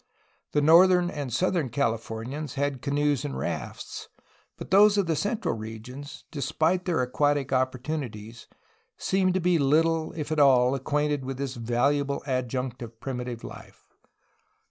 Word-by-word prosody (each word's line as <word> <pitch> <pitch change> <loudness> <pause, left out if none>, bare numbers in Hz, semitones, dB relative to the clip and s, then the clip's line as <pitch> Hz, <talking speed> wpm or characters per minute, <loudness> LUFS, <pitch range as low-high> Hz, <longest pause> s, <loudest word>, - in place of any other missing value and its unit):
The 150 - +2
northern 175 +3 +6
and 145 -4 -5
southern 170 +1 0
Calif 115 -3 -1
ornians 130 +6 -5
had 140 -2 -1
canoes 145 -1 0
and 65 -2 -4
rafts, 65 - -5 0.5
but - - -9
those 205 +2 +6
of 200 - +2
the 165 -1 0
central 210 - -1
regions, 115 +7 -9
despite 160 +5 0
their 170 -8 +1
aquatic 140 +1 0
opportunities, 130 -4 -3 0.5
seemed 185 -1 +1
to - - +2
be 175 -1 +2
little, 160 +3 +2
if 155 -1 -5
at 155 - 0
all, 130 -3 +5
acquainted 145 +1 -1
with 130 0 -5
this 135 -1 -3
valuable 140 +4 0
adjunct 130 -1 -2
of 115 -1 -9
primitive 125 -3 -5
life. - - -11
140 Hz, 145 wpm, -26 LUFS, 125-160 Hz, 0.5 s, northern